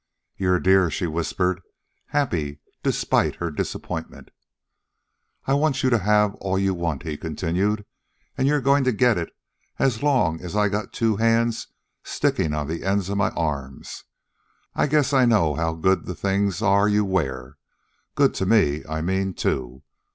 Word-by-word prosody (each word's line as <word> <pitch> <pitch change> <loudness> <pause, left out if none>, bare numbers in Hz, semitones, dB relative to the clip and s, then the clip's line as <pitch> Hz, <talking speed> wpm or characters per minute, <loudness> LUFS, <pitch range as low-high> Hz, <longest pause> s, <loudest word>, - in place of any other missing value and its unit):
"You're 90 -1 +1
a - - -2
dear," 95 -1 +4
she 80 - -2
whispered, 85 +3 -1 0.5
happy 80 - -1 0.2
despite - - +1
her 85 -1 -4
disappointment. 75 - -5 1.1
"I 135 - +1
want 140 -1 +1
you 130 - +3
to 120 - +4
have 105 +1 +3
all 95 -1 -1
you 95 0 +1
want," 85 -5 -3
he 80 -3 -4
continued. 95 +6 -1 0.5
"An' 130 - +1
you're 145 0 +2
goin' 140 +1 +3
to 130 - +2
get 120 -3 +3
it 85 - -4 0.5
as 125 -5 +1
long 130 - +1
as 90 +2 -6
I 105 -1 +3
got 105 +1 -3
two 110 -3 0
hands 115 +1 +1 0.4
stickin' 80 - 0
on 75 -1 -2
the 80 +2 -4
ends 95 0 0
of 100 - -2
my 100 - +2
arms. 70 -5 -4 0.7
I - - +1
guess 145 -1 +2
I 130 -2 +5
know 105 -10 +3
how 80 +2 -1
good 95 +4 +1
the 90 - -4
things 100 +2 0
are 100 0 +4
you 105 0 +2
wear 70 -8 -2 0.6
good - - +3
to 95 - -2
me, 80 -9 +3
I 80 0 -2
mean, 95 +2 -1
too. 65 0 -2
95 Hz, 165 wpm, -23 LUFS, 80-110 Hz, 1.1 s, I